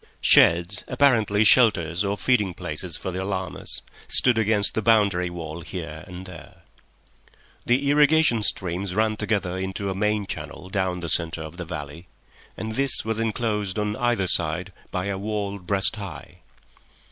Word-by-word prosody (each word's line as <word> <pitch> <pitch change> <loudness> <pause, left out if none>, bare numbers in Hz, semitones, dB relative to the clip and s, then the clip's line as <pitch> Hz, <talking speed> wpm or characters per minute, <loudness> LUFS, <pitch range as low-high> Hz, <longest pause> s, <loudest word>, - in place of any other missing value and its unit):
Sheds, 85 +3 +4
apparently 110 -7 +3
shelters 100 -7 +4
or 100 0 -1
feeding 105 -9 +1
places 80 +2 -5
for 95 - -5
the 95 +1 -4
llamas, 95 -1 -3 0.2
stood 125 -2 +5
against 110 -2 +2
the 110 - -1
boundary 100 -5 +2
wall 85 -1 -7
here 80 -3 -7
and 90 0 -9
there. 90 -4 -13 1.0
The 130 +4 +2
irrigation 150 -4 +4
streams 95 -1 -2
ran 110 0 +1
together 100 -4 -2
into 95 +1 -3
a - - -2
main 105 +1 0
channel 95 - -7
down 95 -2 -1
the 85 - -4
centre 80 -1 +2
of 80 +2 -10
the 90 - -5
valley, 80 +1 -8 0.5
and 110 - -4
this 135 +2 +2
was 110 0 -2
enclosed 110 -3 -2
on 105 0 -1
either 120 -5 +1
side 85 +1 0 0.2
by 90 0 -3
a 100 -1 -3
wall 100 -1 -3
breast 95 +3 0
high. 100 -6 -9
100 Hz, 155 wpm, -24 LUFS, 90-110 Hz, 1.0 s, stood